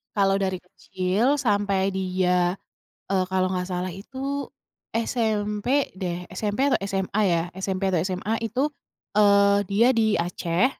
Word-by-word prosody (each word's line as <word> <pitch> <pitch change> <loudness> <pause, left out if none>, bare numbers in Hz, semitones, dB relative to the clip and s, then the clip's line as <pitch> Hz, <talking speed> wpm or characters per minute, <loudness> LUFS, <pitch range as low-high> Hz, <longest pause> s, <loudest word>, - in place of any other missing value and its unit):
kalau 195 -1 +3
dari 190 -1 -1
kecil 190 +8 0
sampai 205 -6 +1
dia, 185 -1 +1 0.6
eee, 190 -1 +2
kalau 185 0 +2
nggak 180 -1 -2
salah 180 0 -2
itu 270 +8 -5 0.5
SMP 225 +2 0
deh, 180 -2 -3
SMP 205 +3 -2
atau - - +2
SMA 195 +2 -1
ya? 170 -2 +2
SMP 190 0 -3
atau 180 -3 +2
SMA 185 +4 -2
itu, 230 +3 -2 0.6
eee, 200 -1 +5 0.2
dia 210 +4 +4
di 225 -2 +2
Aceh, 170 +3 +1
195 Hz, 135 wpm, -25 LUFS, 185-215 Hz, 0.6 s, eee